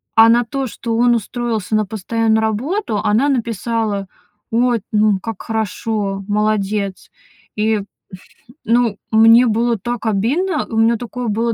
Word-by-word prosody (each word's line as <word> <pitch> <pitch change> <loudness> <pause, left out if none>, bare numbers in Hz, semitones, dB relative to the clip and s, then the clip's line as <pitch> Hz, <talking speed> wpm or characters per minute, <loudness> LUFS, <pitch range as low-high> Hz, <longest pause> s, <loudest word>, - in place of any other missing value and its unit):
а 225 0 +7
на 240 0 +3
то, 270 +1 -3
что 230 0 -4
он 240 0 +4
устроился 225 -2 -2
на 215 -1 +2
постоянную 220 +2 0
работу, 230 - -1
она 230 +8 +2
написала: 225 -4 -2 0.4
ой, 240 -1 +2
ну 210 -2 +2
как 225 0 -6
хорошо, 210 -2 -2
молодец. 205 -2 -1 0.5
И, 215 -1 +1 0.8
ну, 230 -3 +2
мне 225 +3 +6
было 230 +1 +1
так 240 +3 -5
обидно, 280 - 0
у 225 - -4
меня 225 +1 +3
такое 245 0 -5
было 230 +2 0
у - - -2
225 Hz, 140 wpm, -18 LUFS, 210-235 Hz, 0.8 s, а